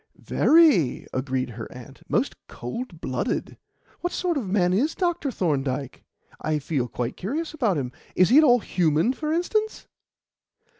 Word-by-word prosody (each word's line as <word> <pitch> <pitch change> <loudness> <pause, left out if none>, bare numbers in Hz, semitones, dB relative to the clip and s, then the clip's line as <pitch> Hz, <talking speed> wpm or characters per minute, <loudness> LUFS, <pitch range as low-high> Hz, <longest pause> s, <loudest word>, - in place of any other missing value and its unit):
"Very," 300 - +4
agreed 130 -1 -2
her 110 0 -8
aunt. 125 -2 -12
"Most - - +1
cold 170 - -7
blooded. 130 -1 -3 0.4
What 355 - -2
sort 360 -2 -1
of 240 -10 -2
man 180 -2 +2
is 275 +12 +1
Dr. 345 -5 0
Thorndyke? 140 - -2 0.4
I 155 0 0
feel 140 -3 -2
quite 120 +1 -4
curious 300 - -3
about 230 - +1
him. 125 -3 -3 0.2
Is 185 - +5
he 265 +6 +7
at - - +6
all 245 -5 +5
human, 170 - +1
for 305 +3 -3
instance?" 425 +6 -1
185 Hz, 150 wpm, -25 LUFS, -, 0.4 s, he